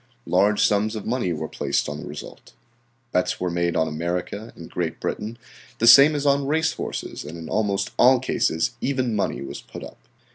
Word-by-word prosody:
Large 100 +4 +3
sums 105 +2 +1
of 105 - -6
money 120 -6 -1
were 80 -1 -3
placed - - -1
on 75 0 -5
the - - -8
result. - - -10 0.6
Bets 90 - 0
were 90 -1 -1
made 85 0 0
on 80 - +2
America 90 +7 -4
and 85 - -10
Great 85 -2 -3
Britain, 110 +3 -4 0.4
the 115 - +1
same 140 +6 +9
as 145 0 -2
on 140 -1 +2
race 160 +2 +1
horses, - - -5
and 80 +3 -8
in 80 -1 -8
almost 100 -1 -1
all 130 0 +6
cases 80 -9 0
even 130 -4 0
money 100 -8 -1
was 70 - -7
put - - -10
up. - - -11
105 Hz, 190 wpm, -23 LUFS, 85-125 Hz, 0.6 s, same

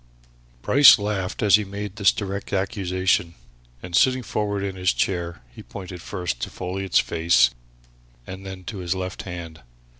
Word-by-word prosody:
Bryce 140 -1 +8
laughed 100 -3 -3
as 100 -1 +6
he 105 - -2
made 100 0 -7
this 100 -2 +5
direct 100 -1 -5
accusation, 95 -3 0 0.5
and 90 -1 -4
sitting 130 +5 +3
forward 100 -2 -2
in 95 -1 -3
his 90 0 +1
chair, 85 -6 -2 0.3
pointed 90 -3 -8
first 90 -12 -4
to - - -3
Folliot's 95 +1 -2
face 80 -7 +3 0.7
and 95 +1 -8
then 95 -1 -8
to 100 +2 -7
his 90 0 -2
left 95 0 -5
hand. 85 -4 -8
95 Hz, 150 wpm, -23 LUFS, 90-100 Hz, 0.7 s, Bryce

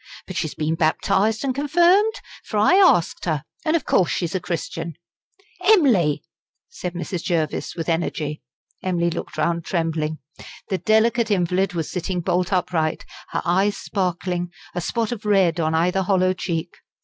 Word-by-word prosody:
But 185 - -8
she's 155 -3 -2
been 155 +1 -1
baptised 190 - +1
and 270 -2 0
confirmed, 350 - +3 0.3
for 215 - -4
I 215 +11 +5
asked 370 - +4
her. 155 -4 -1 0.2
And 310 +1 +2
of 325 - 0
course 180 - +3
she's 170 -3 -2
a 185 - 0
Christian." 165 -2 -4 0.7
"Em'ly!" 235 - +4 0.5
said 180 - -6
Mrs. 175 0 -4
Jervis, 165 -5 -1
with 165 -2 -4
energy. 160 -3 -2 0.4
Emily 170 -2 0
looked 170 - -6
round 170 -1 0
trembling. 160 -3 -1 0.5
The 190 - -1
delicate 225 +1 +2
invalid 185 -1 +1
was 165 -3 -3
sitting 180 0 -2
bolt 180 +2 0
upright, 180 -4 0 0.2
her - - -2
eyes 190 +4 +2
sparkling, 180 -2 -2 0.2
a 175 - -2
spot 225 +5 -1
of 235 -2 -5
red 190 -5 +3
on 160 0 +1
either 180 +4 +2
hollow 185 -1 +2
cheek. 170 -2 -4
180 Hz, 155 wpm, -22 LUFS, 165-210 Hz, 0.7 s, I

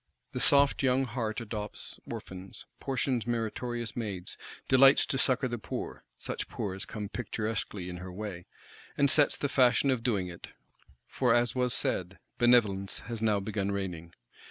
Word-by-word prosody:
The - - -3
soft 140 0 +4
young 130 0 +3
heart 115 -2 -2
adopts 105 -2 -5
orphans, 95 0 -7
portions 130 -3 -1
meritorious 120 0 -2
maids, 100 -6 -4 0.3
delights 135 +1 +7
to 135 - -1
succour 130 -1 +3
the 120 -1 -4
poor,—such - - -6
poor 100 - -3
as 95 +2 -5
come 105 -2 -5
picturesquely 105 -3 -3
in 90 -1 -5
her 90 +1 -7
way; 90 -2 -6 0.5
and 140 -1 +4
sets 145 -2 +3
the 145 - 0
fashion 135 0 +4
of 125 -3 0
doing 105 -7 0
it; 85 -1 -9 0.6
for 115 - +2
as 120 0 +2
was 125 -1 +1
said, 95 -3 -1 0.2
Benevolence 110 -6 +3
has 115 -2 -3
now 105 -2 +3
begun 100 0 -2
reigning. 90 -4 -4
110 Hz, 155 wpm, -30 LUFS, 95-125 Hz, 0.6 s, delights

